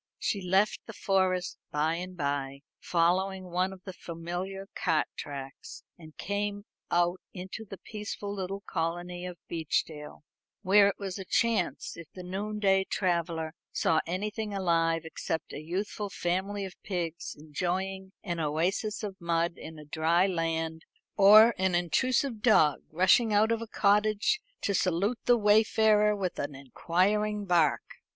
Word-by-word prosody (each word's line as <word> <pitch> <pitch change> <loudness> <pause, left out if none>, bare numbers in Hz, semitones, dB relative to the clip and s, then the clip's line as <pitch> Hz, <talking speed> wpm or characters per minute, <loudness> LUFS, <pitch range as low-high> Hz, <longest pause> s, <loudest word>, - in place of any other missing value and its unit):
She 200 - -1
left 190 +3 +2
the 225 - -8
Forest 185 -3 0
by 155 +2 +1
and 180 +1 -7
by, 140 -2 -2 0.2
following 185 +2 0
one 185 +2 +1
of 190 -1 -12
the 190 - -7
familiar 175 +4 -6
cart - - +1
tracks, 135 -2 -8
and 155 -3 -15
came 205 0 -3 0.2
out 175 +1 +1
into 190 +4 -7
the 195 -1 -9
peaceful 210 -1 -6
little 195 0 -4
colony 175 +1 -3
of 180 -1 -8
Beechdale, 155 -2 -3 0.4
where 200 +1 +6
it 200 - -1
was 195 -1 -5
a - - -4
chance 220 -1 0
if 170 -2 -10
the 185 - -8
noonday 195 +1 0
traveller 170 -4 -1 0.2
saw 160 - +2
anything 210 +4 -3
alive 165 -3 +1
except 160 0 -4
a - - -5
youthful 200 +5 -3
family 195 +3 -2
of 190 - -8
pigs 170 -4 -4
enjoying 185 +5 -3
an 175 -4 -3
oasis 175 +8 -1
of 195 -2 -6
mud 170 0 +1
in 160 0 -10
a 150 - -11
dry 160 +4 +2
land, 165 -3 -2 0.3
or 215 +3 +8
an 190 -1 +2
intrusive 230 - +1
dog 185 - +4
rushing 190 +7 +4
out 215 +2 +4
of 230 0 0
a 230 - -5
cottage 210 - +2 0.2
to 200 - 0
salute 195 +6 +1
the 245 - +5
wayfarer 210 0 +4
with 185 -3 -3
an 145 0 -3
inquiring 200 - 0
bark. 170 -6 +3
185 Hz, 145 wpm, -29 LUFS, 165-205 Hz, 0.4 s, or